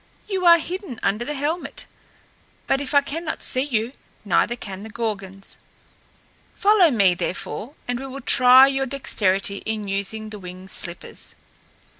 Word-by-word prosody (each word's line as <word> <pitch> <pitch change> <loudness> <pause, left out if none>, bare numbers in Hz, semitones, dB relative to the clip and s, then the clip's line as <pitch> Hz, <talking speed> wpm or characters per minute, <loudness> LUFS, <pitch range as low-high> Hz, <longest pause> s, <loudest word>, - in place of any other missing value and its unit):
"You 380 -3 0
are 340 0 +9
hidden 340 - -6
under 210 +4 +1
the 295 +4 -4
helmet. 300 +5 -3 0.8
But 270 - +1
if 285 +1 -3
I 285 - +7
cannot 320 +3 -4
see 255 - +1
you, 245 -3 -1 0.3
neither 210 +5 +2
can 195 -5 -8
the 220 - -8
Gorgons. 200 -4 -5 1.0
Follow 405 -4 +5
me, 200 -8 +4
therefore, 210 - -5
and 245 0 -2
we 270 - -6
will 270 +1 -8
try 255 +1 +7
your 270 0 0
dexterity 200 -7 0
in 215 0 -4
using 205 +2 -3
the 210 - -7
winged 185 +1 -9
slippers." 170 0 -5
240 Hz, 150 wpm, -22 LUFS, 200-280 Hz, 1.0 s, are